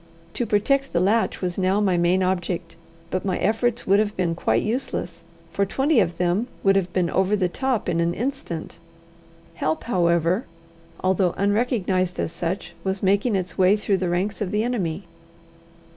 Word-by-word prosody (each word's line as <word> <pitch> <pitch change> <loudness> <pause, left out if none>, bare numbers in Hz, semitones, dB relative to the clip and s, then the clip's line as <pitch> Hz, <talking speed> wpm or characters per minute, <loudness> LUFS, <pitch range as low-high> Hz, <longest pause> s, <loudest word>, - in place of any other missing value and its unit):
To 240 - -2
protect 270 +7 +1
the 170 - +2
latch 210 +5 +1
was 180 0 -2
now 190 +2 +2
my 195 -3 +2
main 175 +2 +2
object, 175 -2 -2 0.4
but 185 - -1
my 190 -2 -1
efforts 230 +4 0
would 200 +2 +4
have 210 -1 -1
been 175 -3 +1
quite 165 - +1
useless, 215 -8 -3 0.3
for 200 - +1
twenty 270 +7 +2
of 170 -4 +1
them 180 +6 +1 0.2
would 195 0 +4
have 185 -2 +1
been 180 -2 0
over 190 +2 +2
the 190 -3 +1
top 260 +5 -1
in 170 -2 0
an 170 +1 +1
instant. 245 - -4 0.7
Help, 160 -1 -2
however, 175 -1 +1 0.6
although 185 -1 +2
unrecognized 200 -4 0
as - - -1
such, 175 +3 -4
was 190 0 -2
making 200 +4 +2
its 180 -2 -3
way 190 +3 +5
through 205 -1 0
the 185 -1 -1
ranks 190 +5 -1
of 200 - -1
the 210 +2 0
enemy. 195 -8 -2
190 Hz, 175 wpm, -23 LUFS, 175-210 Hz, 0.7 s, way